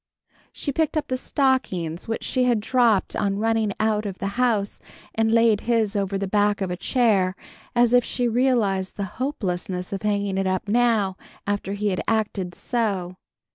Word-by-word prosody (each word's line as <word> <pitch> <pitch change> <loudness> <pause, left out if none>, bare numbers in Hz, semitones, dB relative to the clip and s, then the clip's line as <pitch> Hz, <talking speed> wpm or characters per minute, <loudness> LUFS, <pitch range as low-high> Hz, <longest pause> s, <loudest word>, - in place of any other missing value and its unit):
She 285 - -3
picked 315 +2 0
up 300 -1 -2
the 255 - 0
stockings 255 - -1
which 225 - -3
she 255 -1 +1
had 240 -3 +3
dropped 230 -2 +2
on 200 -2 0
running 225 -1 +1
out 215 -1 +1
of 195 -2 -6
the 195 - -3
house, 215 -5 +1 0.3
and 225 0 +1
laid 230 -2 +4
his 225 -3 +1
over 195 -1 0
the 195 0 -2
back 205 +1 +2
of 190 -2 -2
a - - -1
chair, 195 -3 +2 0.4
as 240 0 +4
if 245 0 +6
she 245 +1 -1
realized 225 -6 +1
the 200 - -2 0.2
hopelessness 180 -8 -3
of 195 - -3
hanging 200 -2 0
it 195 - 0
up 185 +2 -1
now, 215 -4 +2 0.3
after 200 -1 -2
he 205 +1 -1
had 185 - -1
acted 210 -5 -1
so. 200 -7 -2
210 Hz, 175 wpm, -24 LUFS, 195-235 Hz, 0.4 s, if